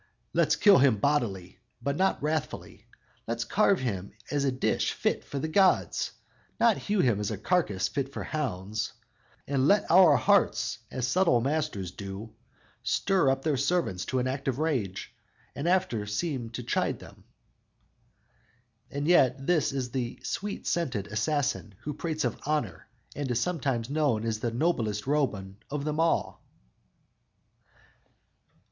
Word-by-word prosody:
_"Let's -, -, +3 dB
kill 205 Hz, -5 st, +6 dB
him 130 Hz, -5 st, +4 dB
bodily, 100 Hz, -9 st, -1 dB, 0.2 s
but 140 Hz, +4 st, -2 dB
not 190 Hz, -3 st, +1 dB
wrathfully; 155 Hz, 0 st, -3 dB, 0.4 s
Let's 115 Hz, 0 st, -1 dB
carve 200 Hz, -, +2 dB
him 100 Hz, -7 st, -3 dB, 0.2 s
as 145 Hz, -2 st, +1 dB
a 135 Hz, -, +2 dB
dish 130 Hz, -, 0 dB
fit -, -, -1 dB
for 140 Hz, -, -6 dB
the 155 Hz, -, -2 dB
gods, 190 Hz, +3 st, +2 dB, 0.5 s
Not 230 Hz, -2 st, +4 dB
hew 205 Hz, -2 st, 0 dB
him 115 Hz, -6 st, +2 dB
as 105 Hz, -, -2 dB
a 110 Hz, -, -3 dB
carcass 105 Hz, -, +1 dB
fit 135 Hz, +3 st, -3 dB
for -, -, -5 dB
hounds; 105 Hz, -8 st, -3 dB, 0.5 s
And 135 Hz, -1 st, +1 dB
let 200 Hz, -1 st, +3 dB
our 170 Hz, -4 st, +7 dB
hearts -, -, +2 dB
as 130 Hz, -2 st, -2 dB
subtle 170 Hz, -3 st, +3 dB
masters 135 Hz, -, -2 dB
do, 100 Hz, +3 st, -8 dB, 0.5 s
Stir 145 Hz, +6 st, +2 dB
up 135 Hz, 0 st, 0 dB
their 150 Hz, -3 st, +1 dB
servants 140 Hz, -, 0 dB
to 130 Hz, -, -2 dB
an 125 Hz, -, +1 dB
act 135 Hz, +2 st, -4 dB
of 130 Hz, -2 st, 0 dB
rage, 130 Hz, -, -2 dB, 0.4 s
And 150 Hz, +5 st, -1 dB
after 150 Hz, -, +1 dB
seem 125 Hz, +1 st, -2 dB
to -, -, -5 dB
chide -, -, 0 dB
them!"_ -, -, -14 dB, 1.7 s
And 145 Hz, +1 st, -3 dB
yet 135 Hz, -6 st, +4 dB
this 165 Hz, -3 st, +2 dB
is 130 Hz, -3 st, -3 dB
the 120 Hz, -2 st, -3 dB
sweet 205 Hz, +1 st, -4 dB
scented 125 Hz, -, -1 dB
assassin 110 Hz, -1 st, -1 dB
who 150 Hz, -, -4 dB
prates 155 Hz, -1 st, -2 dB
of 120 Hz, -, -2 dB
"honor," 125 Hz, -, -2 dB, 0.3 s
and 145 Hz, -2 st, -3 dB
is 120 Hz, -1 st, +1 dB
sometimes 135 Hz, -8 st, -1 dB
known 140 Hz, -6 st, +1 dB
as 110 Hz, -1 st, -1 dB
"the 120 Hz, -, -1 dB
noblest 115 Hz, -6 st, 0 dB
Roman 110 Hz, -10 st, -1 dB
of 145 Hz, 0 st, -3 dB
them 155 Hz, 0 st, -2 dB
all!" 165 Hz, 0 st, +1 dB
135 Hz, 150 wpm, -28 LUFS, 110-155 Hz, 1.7 s, our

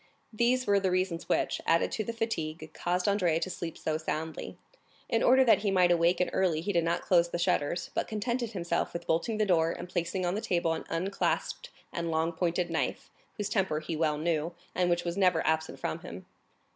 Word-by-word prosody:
These 245 Hz, +3 st, +2 dB
were 200 Hz, -1 st, +4 dB
the 190 Hz, -1 st, +1 dB
reasons 185 Hz, -2 st, -1 dB
which, -, -, +1 dB
added 165 Hz, 0 st, +3 dB
to 215 Hz, -, -1 dB
the 230 Hz, -, -3 dB
fatigue, 160 Hz, -9 st, -3 dB
caused 180 Hz, +2 st, -1 dB
Andrea 180 Hz, -5 st, +2 dB
to 185 Hz, +2 st, -3 dB
sleep 170 Hz, -1 st, -5 dB
so 155 Hz, 0 st, -2 dB
soundly. 160 Hz, 0 st, -4 dB, 0.5 s
In 230 Hz, -, +1 dB
order 260 Hz, +1 st, +6 dB
that 235 Hz, -, +5 dB
he 205 Hz, -, 0 dB
might 180 Hz, -2 st, +4 dB
wake 175 Hz, +2 st, +3 dB
early 175 Hz, -5 st, +2 dB
he 205 Hz, +4 st, -2 dB
did 170 Hz, -1 st, +3 dB
not 170 Hz, +1 st, 0 dB
close 170 Hz, -2 st, +3 dB
the 175 Hz, -, -2 dB
shutters, 170 Hz, -1 st, 0 dB
but -, -, -1 dB
contented 235 Hz, +2 st, -2 dB
himself 170 Hz, -3 st, -1 dB
with 170 Hz, 0 st, -5 dB
bolting 170 Hz, +7 st, 0 dB
the 215 Hz, -, +2 dB
door 165 Hz, -4 st, +3 dB
and 175 Hz, -, -7 dB
placing 180 Hz, +1 st, -2 dB
on 175 Hz, -, 0 dB
the 210 Hz, -, -2 dB
table 170 Hz, -4 st, +1 dB
an -, -, -5 dB
unclasped 190 Hz, +4 st, -1 dB, 0.2 s
and 170 Hz, -1 st, -2 dB
long 160 Hz, +1 st, +1 dB
pointed 175 Hz, +1 st, -1 dB
knife, -, -, -2 dB, 0.3 s
whose 210 Hz, -2 st, -2 dB
temper 185 Hz, -6 st, 0 dB
he 155 Hz, +1 st, -4 dB
well 155 Hz, -1 st, +1 dB
knew, 165 Hz, +1 st, -1 dB, 0.2 s
and 180 Hz, 0 st, +1 dB
which 175 Hz, 0 st, +1 dB
was 170 Hz, +1 st, -3 dB
never 180 Hz, -4 st, +3 dB
absent 160 Hz, 0 st, 0 dB
from -, -, -3 dB
him. -, -, -9 dB
175 Hz, 210 wpm, -29 LUFS, 165-195 Hz, 0.5 s, order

